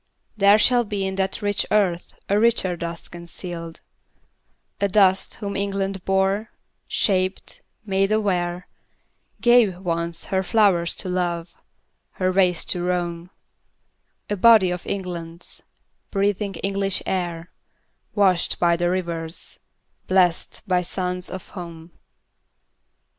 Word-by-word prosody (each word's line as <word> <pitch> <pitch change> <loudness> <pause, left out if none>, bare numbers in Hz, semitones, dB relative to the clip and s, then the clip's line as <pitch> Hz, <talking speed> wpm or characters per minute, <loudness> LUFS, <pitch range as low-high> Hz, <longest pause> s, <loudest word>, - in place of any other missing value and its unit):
There 200 0 +6
shall 245 +2 +4
be 205 -3 -3
In 190 - -2
that 190 +2 -1
rich 205 -1 +1
earth 185 -5 +1
a 200 +1 +2
richer 220 -5 +2
dust 170 0 -6
concealed; 170 -1 -7 1.0
A 200 - +2
dust 195 -1 +3
whom 200 -2 -5
England 195 -1 -2
bore, 195 +3 +1 0.4
shaped, 185 -1 0 0.2
made 195 0 +1
aware, 180 -4 0 0.8
Gave, 240 -6 +5
once, 170 -2 -3
her 190 - +3
flowers 185 -3 +2
to 190 - -3
love, 175 -2 -2 0.6
her 185 0 0
ways 180 -3 +2
to 180 - 0
roam, 175 -1 -2 1.0
A 205 - -1
body 210 -2 +6
of 180 0 -5
England's, 170 -3 -5 0.5
breathing 200 0 0
English 195 +1 -1
air, 175 -2 -3 0.6
Washed 190 -4 +3
by 170 -1 +4
the 175 +1 0
rivers, 170 -2 -4 0.5
blest 180 -2 +1
by 180 -3 +2
suns 180 0 -3
of 185 - -8
home. 170 -2 -9
185 Hz, 115 wpm, -23 LUFS, 175-200 Hz, 1.0 s, There